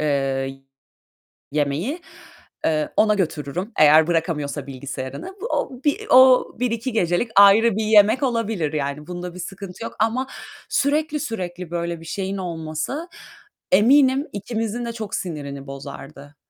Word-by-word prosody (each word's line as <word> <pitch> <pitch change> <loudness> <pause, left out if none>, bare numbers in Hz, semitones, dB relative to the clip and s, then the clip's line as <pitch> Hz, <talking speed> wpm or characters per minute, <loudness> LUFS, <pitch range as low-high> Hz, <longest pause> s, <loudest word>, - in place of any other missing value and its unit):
eee, 135 -2 -1 0.9
yemeği. 155 - -1 0.6
Eee, 155 -1 0
ona 215 -1 +4
götürürüm 175 - -3
eğer 155 +1 +7
bırakamıyorsa 155 -4 -1
bilgisayarını. 135 - -7
Bu 465 - -2
o 255 0 -2
bir 290 - 0
o 255 0 +7
1-2 245 0 -1
gecelik 180 +2 0
ayrı 200 +2 +7
bir 220 - 0
yemek 215 +3 +5
olabilir 225 - -1
yani 150 0 -3
bunda 180 0 -6
bir 180 - -8
sıkıntı 195 +3 -8
yok - - -7
ama 235 +4 +1 0.4
sürekli 300 +2 0
sürekli 180 - -5
böyle 170 -1 -3
bir 165 - -12
şeyin 195 +3 -3
olması 165 - -4 0.6
eminim 265 +7 +5
ikimizin 225 +3 -3
de 235 - -4
çok 220 -3 -6
sinirini 140 -5 -5
bozardı. 140 +1 -10
180 Hz, 130 wpm, -22 LUFS, 150-230 Hz, 0.9 s, eğer